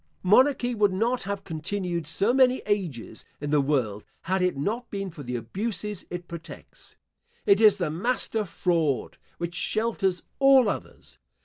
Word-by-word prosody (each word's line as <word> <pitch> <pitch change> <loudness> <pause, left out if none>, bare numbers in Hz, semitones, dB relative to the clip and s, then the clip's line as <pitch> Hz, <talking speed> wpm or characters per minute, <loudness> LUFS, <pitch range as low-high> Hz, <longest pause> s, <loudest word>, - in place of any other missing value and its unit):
* - - -41
Monarchy 245 +5 +4
would 205 -4 +2
not 235 +6 0
have 200 0 -4
continued 170 0 -3
so 195 +8 +2
many 260 -1 +4
ages 170 - -3 0.2
in 145 0 -4
the 150 -1 +4
world, 125 -8 -1 0.2
had 190 +2 -1
it 180 -5 +1
not 225 - -2
been 195 -2 -4
for 160 - -10
the 125 -2 -4
abuses 205 - -4
it 175 0 -6
protects. 170 -1 -11 0.5
It 200 +2 +5
is 210 -2 +7
the 175 -6 -1
master 220 +4 0
fraud, 165 -6 -1 0.2
which 170 0 -4
shelters 195 -3 0 0.2
all 270 -3 +6
others. - - -7
190 Hz, 155 wpm, -26 LUFS, 165-220 Hz, 0.5 s, is